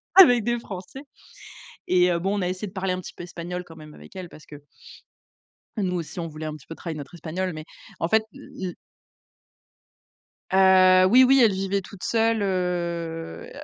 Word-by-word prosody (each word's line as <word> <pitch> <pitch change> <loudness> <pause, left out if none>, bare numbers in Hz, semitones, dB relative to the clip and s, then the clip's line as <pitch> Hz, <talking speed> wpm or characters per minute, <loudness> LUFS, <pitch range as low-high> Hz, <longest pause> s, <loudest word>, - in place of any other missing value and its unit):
avec 245 - +8
des 240 +1 0
Français. 190 +4 -9 0.9
Et 180 0 +4
heu, 170 - 0
bon 195 +4 -1
on - - -2
a - - 0
essayé 185 +3 -4
de 185 - -12
parler 190 -1 -1
un 185 - -3
petit - - -10
peu - - -7
espagnol 175 +1 -6
quand 165 - -14
même 155 -1 -12
avec - - -15
elle 180 -2 -7
parce 150 - -15
que 145 -1 -12 1.2
nous 185 -3 -1
aussi, 170 +1 -5
on 165 - -3
voulait 155 0 -8
un 155 - -4
petit 150 - -15
peu 165 - -8
travailler 165 -2 -6
notre 145 +4 -9
espagnol 180 +3 -3
mais, 155 0 -8 0.3
en 165 - 0
fait, 220 +3 +3
le 185 - -7
le - - -8 1.8
Heu, 185 -1 +6
oui, 245 +7 +7
oui, 265 0 +5
elle 220 - +5
vivait 195 +1 -1
toute 185 0 -12
seule 225 -1 +1
heu, 175 - -3
185 Hz, 195 wpm, -24 LUFS, 170-200 Hz, 1.8 s, avec